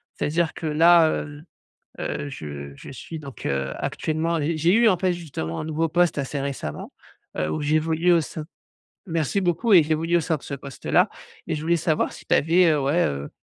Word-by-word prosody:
C'est-à-dire 165 Hz, +1 st, 0 dB
que -, -, -6 dB
là, 165 Hz, +2 st, +6 dB
hem, 145 Hz, +1 st, -5 dB, 0.6 s
heu, 145 Hz, -, -3 dB
je 70 Hz, -, -7 dB
je -, -, -11 dB
suis 160 Hz, +5 st, -8 dB
donc, 140 Hz, -4 st, -10 dB
heu, 70 Hz, -1 st, -1 dB
actuellement 160 Hz, +2 st, -1 dB
les 155 Hz, +2 st, -1 dB
j'ai 165 Hz, +3 st, +3 dB
eu, 230 Hz, +2 st, +5 dB
en 185 Hz, -, +3 dB
fait, 185 Hz, +1 st, +1 dB
justement, 135 Hz, -, -5 dB
un -, -, -4 dB
nouveau 160 Hz, +1 st, 0 dB
poste 175 Hz, +1 st, +2 dB
assez 140 Hz, 0 st, -3 dB
récemment, 135 Hz, -, -5 dB, 0.5 s
heu, 75 Hz, 0 st, -1 dB
où 80 Hz, -, -2 dB
j'évolue 160 Hz, +3 st, +2 dB
au 170 Hz, -1 st, +4 dB
sein 155 Hz, 0 st, -7 dB, 0.6 s
merci 165 Hz, +2 st, 0 dB
beaucoup 185 Hz, +5 st, +1 dB
et 180 Hz, -4 st, +9 dB
j'évolue 160 Hz, +3 st, 0 dB
au -, -, +3 dB
sein 160 Hz, 0 st, 0 dB
de 140 Hz, -, -15 dB
ce 140 Hz, -, -5 dB
poste-là 140 Hz, -1 st, 0 dB, 0.4 s
et -, -, -1 dB
je -, -, -5 dB
voulais 170 Hz, +2 st, +2 dB
savoir 160 Hz, -1 st, 0 dB
si -, -, -12 dB
tu -, -, +1 dB
avais, 170 Hz, +4 st, +4 dB
heu, 150 Hz, -2 st, +2 dB
ouais, 145 Hz, +6 st, +2 dB
heu, 70 Hz, 0 st, -4 dB
155 Hz, 205 wpm, -24 LUFS, 140-170 Hz, 0.6 s, et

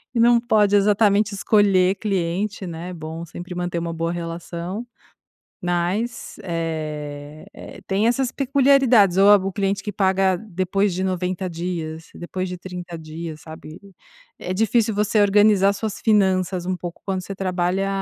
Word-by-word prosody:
não 235 Hz, 0 st, +5 dB
pode 210 Hz, -3 st, +3 dB
exatamente 205 Hz, 0 st, +3 dB
escolher 195 Hz, -3 st, +3 dB
cliente, 195 Hz, 0 st, -2 dB
né, 170 Hz, 0 st, -6 dB
é -, -, -6 dB
bom 160 Hz, 0 st, -7 dB
sempre 175 Hz, +2 st, -8 dB
manter 175 Hz, -1 st, -3 dB
uma 170 Hz, 0 st, -4 dB
boa 165 Hz, +1 st, -2 dB
relação, 175 Hz, +5 st, -5 dB, 0.8 s
mas 180 Hz, +7 st, -2 dB
eh 155 Hz, -4 st, -5 dB
eh, -, -, -11 dB
tem 200 Hz, +3 st, +1 dB
essas 245 Hz, +1 st, +1 dB
peculiaridades, 265 Hz, -8 st, +4 dB
ou 195 Hz, +1 st, +6 dB
a 205 Hz, -, +9 dB
o 195 Hz, -1 st, -2 dB
cliente 195 Hz, +1 st, -1 dB
que 210 Hz, -, -4 dB
paga 190 Hz, -1 st, +2 dB
depois 195 Hz, 0 st, -1 dB
de 185 Hz, +2 st, -2 dB
90 185 Hz, 0 st, -2 dB
dias, 165 Hz, -2 st, -5 dB
depois 185 Hz, +1 st, -5 dB
de 180 Hz, -, -6 dB
30 175 Hz, -2 st, -7 dB
dias, 160 Hz, 0 st, -7 dB
sabe. 160 Hz, 0 st, -11 dB, 0.6 s
É 180 Hz, -, -4 dB
difícil 225 Hz, +2 st, +1 dB
você 210 Hz, +1 st, +2 dB
organizar 205 Hz, -1 st, +4 dB
suas 205 Hz, 0 st, -5 dB
finanças 190 Hz, -4 st, +2 dB
um 185 Hz, 0 st, -1 dB
pouco, 175 Hz, 0 st, -8 dB
quando 190 Hz, -1 st, -2 dB
você 195 Hz, -, -7 dB
trabalha 185 Hz, 0 st, -1 dB
185 Hz, 150 wpm, -22 LUFS, 170-205 Hz, 0.8 s, a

